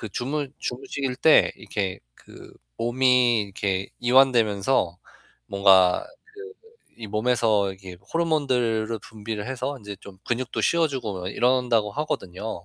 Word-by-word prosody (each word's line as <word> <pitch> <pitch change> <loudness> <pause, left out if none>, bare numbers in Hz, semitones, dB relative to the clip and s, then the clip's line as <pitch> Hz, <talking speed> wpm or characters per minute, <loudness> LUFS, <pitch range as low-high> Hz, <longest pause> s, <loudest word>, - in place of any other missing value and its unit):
그 110 - -6
주무 140 +6 -3
주무실 130 +1 -4
때 155 +4 +5
이렇게 100 -3 -4 0.2
그 - - -15 0.2
몸이 125 -1 +3
이렇게 100 -1 -3
이완되면서 120 -6 +3 0.5
뭔가 95 -2 +4 0.3
그 420 +1 -10 0.5
이 110 - -6
몸에서 110 -2 +1
이게 95 -1 -11 0.2
호르몬들을 125 -9 0
분비를 105 0 -6
해서 135 +2 -3
인제 100 -1 -9
좀 95 -2 -13
근육도 125 +1 -2
씌워 170 -1 +2
주고 110 -10 -5
이런다고 120 -2 +1
하거든요. 100 - -4
115 Hz, 275 characters per minute, -24 LUFS, 100-130 Hz, 0.5 s, 때